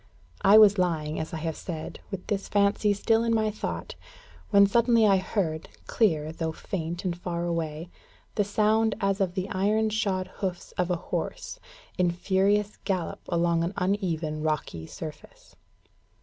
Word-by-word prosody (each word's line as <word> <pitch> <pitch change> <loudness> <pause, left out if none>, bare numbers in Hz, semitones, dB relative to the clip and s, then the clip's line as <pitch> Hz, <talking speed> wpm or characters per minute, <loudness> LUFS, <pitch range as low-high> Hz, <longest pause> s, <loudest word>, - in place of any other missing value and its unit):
I 200 +2 +7
was 210 -2 +7
lying, 160 -4 0
as 160 - -4
I 165 - -4
have 160 0 -3
said, 160 -4 -6
with 195 -3 -6
this 200 -2 -2
fancy 205 +1 +2
still 225 +3 +2
in 230 -1 +2
my 215 -1 +1
thought, 210 - -5 0.6
when 200 -1 +7
suddenly 230 +2 +4
I 195 -2 +5
heard, 180 -4 -2 0.2
clear, 160 -9 +1
though 160 0 -3
faint 170 +1 -5
and 175 -2 0
far 175 -1 -3
away, 165 0 -3 0.4
the 205 - +2
sound 215 +2 +2
as 195 0 0
of 185 -2 0
the 190 0 -2
iron 215 +3 +1
shod 195 -4 0
hoofs 185 -3 -4
of 180 0 -1
a 180 - +2
horse, - - -4 0.4
in 180 -1 +4
furious 195 +4 +1
gallop 185 -4 -2
along 170 -1 +2
an 170 +4 -2
uneven 170 -5 -1
rocky 150 - -2
surface. 155 - -10
185 Hz, 160 wpm, -27 LUFS, 165-205 Hz, 0.6 s, I